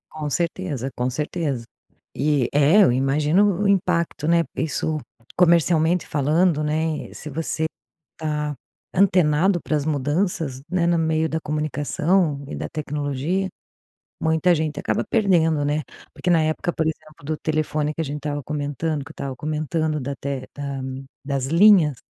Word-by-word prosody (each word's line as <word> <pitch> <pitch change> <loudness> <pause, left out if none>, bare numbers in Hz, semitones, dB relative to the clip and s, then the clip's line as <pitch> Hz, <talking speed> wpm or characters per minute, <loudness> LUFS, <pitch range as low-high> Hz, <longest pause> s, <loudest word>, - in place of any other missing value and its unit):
Com 155 -1 -4
certeza, 160 -5 -2
com 125 +1 0
certeza. 145 -2 -2 0.5
E, 145 -2 +1
é, 150 +8 +6
eu 175 - +5
imagino 150 +10 +2
o - - +1
o - - +2
impacto, 175 -5 +1
né, 170 0 +4
isso 155 0 -1 0.4
comercialmente 170 -1 +3
falando, 155 +3 +2
né, 155 +1 -2
se 150 - -8
você 160 +1 -2 0.5
está 150 -1 -2 0.4
antenado 180 -1 +3
para 155 - 0
as 145 - -3
mudanças, 150 -1 -1
né, 185 -2 +1
no 170 0 +3
meio 160 0 +1
da 160 - -1
comunicação 150 +1 0
e - - -5
da - - -4
tecnologia, 150 +4 -2 0.7
muita 160 +2 +3
gente 155 -2 -2
acaba - - -1
perdendo, 165 -8 +2
né? 150 +1 0 0.3
Porque 180 - -2
na 165 -2 +4
época, 155 +2 -1
por 160 - -1
exemplo, 155 -2 -6
do 155 +2 -2
telefone, 155 -1 -1
que - - -5
a - - -2
gente 145 0 -4
estava 145 -1 -3
comentando, 145 +1 -3
que 145 - -13
eu - - -8
estava 135 -4 -5
comentando, 155 +1 -1
da 140 +2 -3
te 135 -2 -4
da 140 -1 -4 0.4
das 135 -2 -1
linhas, 165 -2 +5
155 Hz, 155 wpm, -23 LUFS, 145-170 Hz, 0.7 s, é